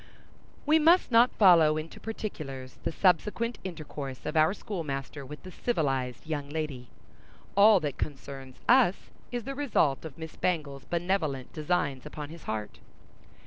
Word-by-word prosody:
We 310 Hz, +2 st, +5 dB
must 330 Hz, -1 st, +5 dB
not 235 Hz, +2 st, +6 dB
follow 165 Hz, -6 st, +6 dB
into 155 Hz, +1 st, -6 dB
particulars 135 Hz, -, -6 dB
the -, -, -2 dB
subsequent 210 Hz, +7 st, +1 dB
intercourse 150 Hz, -6 st, -7 dB
of 150 Hz, -, -3 dB
our 155 Hz, +1 st, +5 dB
schoolmaster 145 Hz, -9 st, -5 dB
with 150 Hz, +3 st, -10 dB
the 185 Hz, -, -9 dB
civilized 135 Hz, -, -1 dB
young 145 Hz, -3 st, -3 dB
lady. 145 Hz, -5 st, -4 dB, 0.7 s
All 205 Hz, 0 st, +7 dB
that 145 Hz, -3 st, -3 dB
concerns 135 Hz, -2 st, -6 dB
us 240 Hz, -7 st, +4 dB, 0.2 s
is 240 Hz, -1 st, -3 dB
the 275 Hz, -, -4 dB
result 225 Hz, -, +1 dB
of 155 Hz, -5 st, -9 dB
Miss 160 Hz, -1 st, -8 dB
Bangle's 150 Hz, -6 st, -2 dB
benevolent 170 Hz, -7 st, -1 dB
designs 150 Hz, -4 st, -1 dB
upon 150 Hz, -1 st, -7 dB
his 165 Hz, 0 st, -11 dB
heart. 105 Hz, -1 st, -4 dB
155 Hz, 145 wpm, -29 LUFS, 140-195 Hz, 0.7 s, All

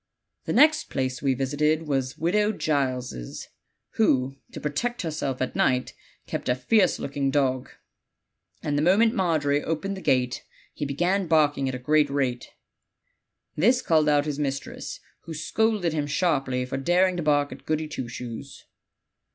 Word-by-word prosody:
"The -, -, -1 dB
next 310 Hz, 0 st, +5 dB
place 130 Hz, -1 st, -2 dB
we 135 Hz, -2 st, +1 dB
visited 150 Hz, +4 st, +1 dB
was 135 Hz, -2 st, -1 dB
Widow 210 Hz, +6 st, +1 dB
Giles', 130 Hz, -, -2 dB, 0.5 s
who, 135 Hz, -11 st, +2 dB, 0.2 s
to -, -, -7 dB
protect 205 Hz, +11 st, -2 dB
herself 145 Hz, -5 st, -2 dB
at 130 Hz, -, -4 dB
night, 125 Hz, -1 st, +1 dB, 0.3 s
kept -, -, -4 dB
a 125 Hz, -, +3 dB
fierce 180 Hz, -, +2 dB
looking 140 Hz, 0 st, -2 dB
dog, 130 Hz, -2 st, 0 dB, 0.9 s
and 145 Hz, -, -1 dB
the -, -, +1 dB
moment 205 Hz, +8 st, +4 dB
Margery 155 Hz, -, +1 dB
opened 165 Hz, +5 st, -2 dB
the 190 Hz, -, -8 dB
gate 125 Hz, -4 st, +1 dB, 0.3 s
he 145 Hz, -, -4 dB
began 175 Hz, +7 st, 0 dB
barking 145 Hz, -4 st, +2 dB
at 130 Hz, -, -3 dB
a -, -, -3 dB
great 150 Hz, +3 st, +2 dB
rate. 130 Hz, -3 st, -1 dB, 1.1 s
This 240 Hz, +11 st, +3 dB
called 155 Hz, -2 st, +3 dB
out 145 Hz, -1 st, +3 dB
his 150 Hz, -1 st, -3 dB
mistress, 140 Hz, -2 st, -4 dB, 0.3 s
who 165 Hz, -, -6 dB
scolded 205 Hz, +1 st, 0 dB
him 150 Hz, -2 st, -1 dB
sharply 135 Hz, -6 st, 0 dB
for 135 Hz, +1 st, -4 dB
daring 180 Hz, +6 st, +2 dB
to -, -, -1 dB
bark 145 Hz, -2 st, +2 dB
at -, -, -11 dB
Goody 155 Hz, 0 st, 0 dB
Two 130 Hz, -5 st, -5 dB
Shoes. 125 Hz, +2 st, -8 dB
145 Hz, 155 wpm, -25 LUFS, 135-170 Hz, 1.1 s, next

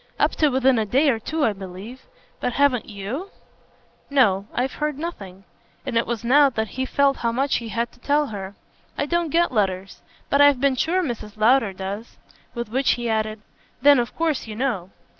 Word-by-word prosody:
"Up -, -, +3 dB
to 305 Hz, -, +4 dB
within 260 Hz, -2 st, +3 dB
a 220 Hz, -, 0 dB
day 275 Hz, +6 st, +3 dB
or 225 Hz, -, -2 dB
two 310 Hz, +6 st, -1 dB
I 215 Hz, -, +1 dB
believe. 195 Hz, -, -10 dB, 0.3 s
But 250 Hz, -, -2 dB
haven't 275 Hz, -4 st, +2 dB
YOU?" 220 Hz, -, -5 dB, 0.8 s
"No 210 Hz, -8 st, +3 dB
I've 255 Hz, +2 st, -1 dB
heard 300 Hz, -2 st, -1 dB
nothing." 200 Hz, -, -7 dB, 0.4 s
And 265 Hz, -3 st, -4 dB
it 230 Hz, -, +2 dB
was 235 Hz, -2 st, -3 dB
now 280 Hz, +4 st, +5 dB
that 220 Hz, -4 st, -3 dB
he 260 Hz, 0 st, -3 dB
felt 280 Hz, 0 st, +2 dB
how 235 Hz, -, -1 dB
much 270 Hz, +4 st, +1 dB
he 230 Hz, -1 st, -6 dB
had 235 Hz, +1 st, -2 dB
to -, -, -22 dB
tell 290 Hz, +4 st, +1 dB
her. 195 Hz, 0 st, -6 dB, 0.4 s
"I 285 Hz, -, 0 dB
don't 340 Hz, +2 st, 0 dB
get 340 Hz, +2 st, +2 dB
letters. 195 Hz, -4 st, -1 dB, 0.3 s
But 280 Hz, -, +4 dB
I've 285 Hz, -2 st, +6 dB
been 275 Hz, 0 st, +2 dB
sure 355 Hz, +8 st, +1 dB
Mrs. 220 Hz, -7 st, -5 dB
Lowder 225 Hz, 0 st, +4 dB
does." 195 Hz, +4 st, -6 dB, 0.4 s
With 235 Hz, -2 st, -4 dB
which 260 Hz, +3 st, +2 dB
he 240 Hz, -2 st, -2 dB
added: 215 Hz, -1 st, -1 dB, 0.4 s
"Then 285 Hz, -2 st, +7 dB
of 240 Hz, -, -3 dB
course 320 Hz, -7 st, -1 dB
you 215 Hz, -, -6 dB
know." 220 Hz, -8 st, -2 dB
245 Hz, 195 wpm, -23 LUFS, 215-280 Hz, 0.8 s, Then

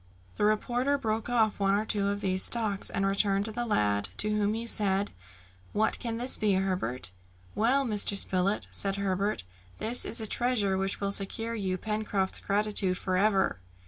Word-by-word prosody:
The -, -, +2 dB
reporter 245 Hz, +6 st, +1 dB
broke 225 Hz, -3 st, -2 dB
off 220 Hz, -4 st, +2 dB
one 195 Hz, 0 st, +3 dB
or 210 Hz, +2 st, 0 dB
two 205 Hz, -2 st, 0 dB
of 200 Hz, 0 st, -2 dB
these 185 Hz, -1 st, 0 dB
stalks 215 Hz, -4 st, +1 dB
and 195 Hz, -, -1 dB
returned 195 Hz, 0 st, +2 dB
to 220 Hz, -, -2 dB
the 240 Hz, +2 st, -3 dB
lad, 100 Hz, -, +1 dB
to 210 Hz, -, 0 dB
whom 210 Hz, 0 st, +1 dB
he 230 Hz, +1 st, -4 dB
said, 200 Hz, -3 st, +1 dB, 0.6 s
"What 220 Hz, +1 st, +1 dB
can 230 Hz, -2 st, -3 dB
this 245 Hz, +2 st, 0 dB
be, 210 Hz, -2 st, +2 dB
Herbert?" 180 Hz, -, -1 dB, 0.4 s
"Well, 260 Hz, +6 st, +2 dB
Mr. 210 Hz, -3 st, +2 dB
Spilett," 190 Hz, +2 st, +1 dB
said 195 Hz, -1 st, 0 dB
Herbert, 200 Hz, -, -1 dB, 0.3 s
"this 235 Hz, +3 st, 0 dB
is -, -, -3 dB
a 220 Hz, -, -3 dB
treasure 215 Hz, -4 st, 0 dB
which 195 Hz, +1 st, -1 dB
will 200 Hz, -1 st, -1 dB
secure 220 Hz, +3 st, -2 dB
you 190 Hz, -4 st, -2 dB
Pencroft's 210 Hz, -2 st, -1 dB
gratitude 200 Hz, -2 st, +1 dB
for 185 Hz, -1 st, -2 dB
ever." 195 Hz, -, +2 dB
205 Hz, 175 wpm, -29 LUFS, 195-220 Hz, 0.6 s, one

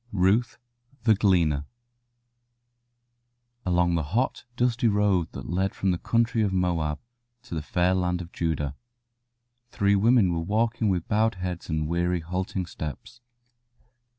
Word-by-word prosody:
RUTH, 105 Hz, +5 st, +2 dB, 0.5 s
THE 110 Hz, -2 st, +5 dB
GLEANER 85 Hz, -8 st, +2 dB, 2.0 s
Along 90 Hz, -1 st, +2 dB
the 85 Hz, -, +1 dB
hot, 105 Hz, -, -1 dB
dusty 120 Hz, 0 st, +1 dB
road 100 Hz, -5 st, +2 dB
that -, -, -7 dB
led 95 Hz, +3 st, -1 dB
from 95 Hz, -, +1 dB
the 90 Hz, -, -1 dB
country 115 Hz, 0 st, +1 dB
of 100 Hz, -3 st, +1 dB
Moab 85 Hz, -5 st, 0 dB, 0.5 s
to 120 Hz, -, -10 dB
the 80 Hz, -, -2 dB
fair 90 Hz, +4 st, +1 dB
land 90 Hz, -1 st, 0 dB
of 85 Hz, 0 st, -8 dB
Judah 75 Hz, -4 st, -2 dB, 0.9 s
three 100 Hz, -3 st, +2 dB
women 105 Hz, -3 st, +4 dB
were 85 Hz, -, -1 dB
walking 110 Hz, +4 st, 0 dB
with 90 Hz, -3 st, -1 dB
bowed 110 Hz, 0 st, +2 dB
heads 90 Hz, -1 st, -5 dB
and 80 Hz, -1 st, -1 dB
weary, 85 Hz, +1 st, 0 dB
halting 90 Hz, +2 st, -3 dB
steps. 80 Hz, -, -8 dB
90 Hz, 135 wpm, -26 LUFS, 85-105 Hz, 2.0 s, THE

